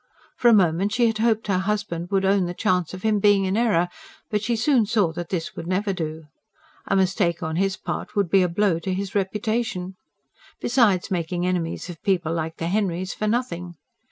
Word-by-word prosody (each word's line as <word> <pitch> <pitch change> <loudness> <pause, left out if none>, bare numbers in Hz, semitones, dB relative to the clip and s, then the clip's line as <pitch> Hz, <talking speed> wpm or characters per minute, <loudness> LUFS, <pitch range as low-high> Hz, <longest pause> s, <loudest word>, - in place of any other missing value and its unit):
For 245 - +2
a 235 - +7
moment 190 +1 +3
she 245 0 +3
had 225 -1 0
hoped 225 -1 +2
her 195 -3 +1
husband 190 -4 -2
would 195 -1 +1
own 195 -2 +3
the 175 - -5
chance 180 -6 0
of 185 0 -8
him 215 -1 +2
being 200 -1 +4
in 190 +1 0
error. 210 -7 +2 0.4
But 210 -1 +1
she 235 +2 0
soon 230 -1 +2
saw 200 -6 +2
that 175 0 -6
this 170 -4 -3
would 165 - -6
never 195 +2 0
do. 160 -3 -4 0.6
A - - +1
mistake 185 -2 +1
on 160 0 -2
his 195 +1 0
part - - -5
would 200 -3 +2
be 195 - +5
a 180 - +2
blow 180 -1 +1
to 185 +2 -2
his 195 0 -4
reputation. 210 -1 -1 0.7
Besides 220 -7 +2
making 175 0 -1
enemies 180 -2 -2
of 175 -3 -9
people 175 -5 0
like 160 0 -3
the 165 - -3
Henrys 185 -1 -1
for 215 - -2
nothing. 180 -7 -2
190 Hz, 205 wpm, -23 LUFS, 175-210 Hz, 0.7 s, a